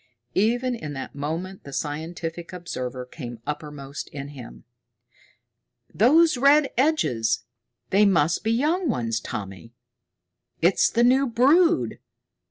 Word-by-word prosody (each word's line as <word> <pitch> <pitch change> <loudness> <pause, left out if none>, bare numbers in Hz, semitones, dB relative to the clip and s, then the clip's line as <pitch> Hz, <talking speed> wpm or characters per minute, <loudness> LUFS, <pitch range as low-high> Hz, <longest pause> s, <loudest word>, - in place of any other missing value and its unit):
Even 245 +5 +1
in 155 -11 -6
that 135 - -7
moment 165 +7 -5
the 140 - -10
scientific 165 +4 -5
observer 130 -8 -5
came 120 -3 -8
uppermost 145 -2 -6
in 140 -1 -7
him. 130 -5 -11 1.3
"Those 305 +7 +5
red 280 +2 +4
edges? 125 - +1 0.5
They 205 +2 +5
must 170 -3 +2
be 220 - +1
young 310 +8 +1
ones, 115 - -1
Tommy. 100 +2 -7 0.9
It's 175 +3 +3
the 235 - +2
new 260 +3 +4
brood! 315 +9 +3
170 Hz, 115 wpm, -24 LUFS, -, 1.3 s, Those